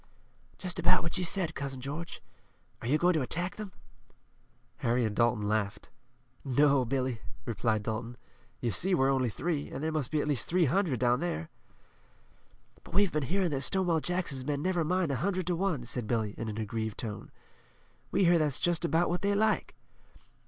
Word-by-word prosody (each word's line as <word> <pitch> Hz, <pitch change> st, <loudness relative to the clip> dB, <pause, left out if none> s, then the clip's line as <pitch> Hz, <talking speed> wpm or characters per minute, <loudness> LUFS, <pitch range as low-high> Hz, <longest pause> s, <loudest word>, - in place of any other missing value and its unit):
"Just 185 Hz, -1 st, -1 dB
about 175 Hz, -, +4 dB
what 170 Hz, +3 st, -1 dB
you -, -, 0 dB
said, 175 Hz, -2 st, +2 dB
Cousin 135 Hz, -2 st, -4 dB
George. 145 Hz, +6 st, -6 dB, 0.6 s
Are -, -, -4 dB
you 145 Hz, +5 st, +3 dB
going 175 Hz, +3 st, +3 dB
to 155 Hz, -, +1 dB
attack 175 Hz, +8 st, -1 dB
them?" 210 Hz, -3 st, -6 dB, 1.1 s
Harry 120 Hz, +1 st, +1 dB
and 105 Hz, -1 st, -2 dB
Dalton 115 Hz, -3 st, +2 dB
laughed. 105 Hz, -1 st, -1 dB, 0.5 s
"No, 140 Hz, 0 st, +4 dB
Billy," 130 Hz, -2 st, -1 dB, 0.2 s
replied 110 Hz, -1 st, 0 dB
Dalton. 115 Hz, +2 st, -4 dB, 0.4 s
"You 120 Hz, -, 0 dB
see 185 Hz, -, +1 dB
we're 135 Hz, -2 st, +3 dB
only 130 Hz, -3 st, +1 dB
three, 145 Hz, +5 st, -2 dB
and 135 Hz, -, -5 dB
there 160 Hz, -, 0 dB
must 155 Hz, -5 st, -1 dB
be 155 Hz, -, 0 dB
at 145 Hz, -, -1 dB
least 145 Hz, -5 st, 0 dB
three 180 Hz, 0 st, +4 dB
hundred 160 Hz, -, +1 dB
down 125 Hz, +1 st, +3 dB
there." 125 Hz, -, -3 dB, 1.3 s
"But -, -, -11 dB
we've 200 Hz, -2 st, +4 dB
been 150 Hz, -, 0 dB
hearin' 190 Hz, -3 st, +1 dB
that 135 Hz, -2 st, -1 dB
Stonewall 175 Hz, +3 st, +1 dB
Jackson's 170 Hz, -6 st, -1 dB
men 145 Hz, +1 st, -2 dB
never 180 Hz, -2 st, +1 dB
mind 180 Hz, -1 st, +1 dB
a 135 Hz, -, 0 dB
hundred 185 Hz, +1 st, -1 dB
to 175 Hz, 0 st, 0 dB
one," 170 Hz, -7 st, 0 dB
said 120 Hz, -1 st, -2 dB
Billy, 110 Hz, -3 st, 0 dB
in 115 Hz, -, -4 dB
an 105 Hz, -, -5 dB
aggrieved 110 Hz, 0 st, -3 dB
tone. 105 Hz, -3 st, -6 dB, 0.8 s
"We 195 Hz, +2 st, +2 dB
hear 175 Hz, -1 st, +5 dB
that's 150 Hz, -4 st, +1 dB
just 175 Hz, 0 st, +1 dB
about 170 Hz, +1 st, +2 dB
what 175 Hz, +1 st, -1 dB
they 200 Hz, 0 st, +2 dB
like." 215 Hz, +1 st, +1 dB
145 Hz, 190 wpm, -30 LUFS, 120-175 Hz, 1.3 s, hear